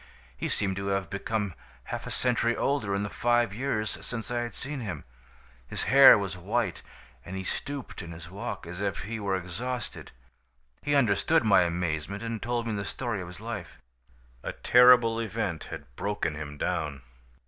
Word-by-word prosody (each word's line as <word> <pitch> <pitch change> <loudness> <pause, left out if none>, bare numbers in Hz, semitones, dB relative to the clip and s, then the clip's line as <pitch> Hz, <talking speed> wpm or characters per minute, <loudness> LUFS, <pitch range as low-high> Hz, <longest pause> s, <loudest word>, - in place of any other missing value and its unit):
He - - -3
seemed 95 -1 -1
to 100 0 -3
have 95 -2 -1
become 100 -1 -2 0.3
half - - -5
a - - -4
century 120 -1 +1
older 135 -8 +1
in 100 - 0
the 100 - -3
five 120 -3 +2
years 110 -3 -2
since 115 -1 -5
I 120 - 0
had 120 0 -4
seen 140 +1 -5
him. 95 - -5 0.6
His - - -3
hair 135 +3 +9
was 100 -3 -3
white, 100 0 -1 0.4
and 95 - -7
he 95 - -3
stooped 140 +5 -4
in 85 -2 -8
his 85 0 -9
walk, 100 -2 -5
as 90 +3 -6
if 100 -3 -1
he 110 +3 -4
were 100 -2 0
exhausted. 115 +8 -4 0.7
He 145 0 +1
understood 125 +4 +3
my 110 -3 +6
amazement 85 +3 -2
and 115 -1 -3
told 120 0 -1
me 115 - -1
the 100 -1 -2
story 115 0 -3
of 90 - -6
his 90 0 -10
life. 115 +2 -6 0.6
"A - - -4
terrible 125 -2 +6
event 105 -7 -2
had 70 -5 -9
broken 100 -3 -1
him 75 -1 -6
down. 75 -5 -2
105 Hz, 180 wpm, -28 LUFS, 90-120 Hz, 0.7 s, hair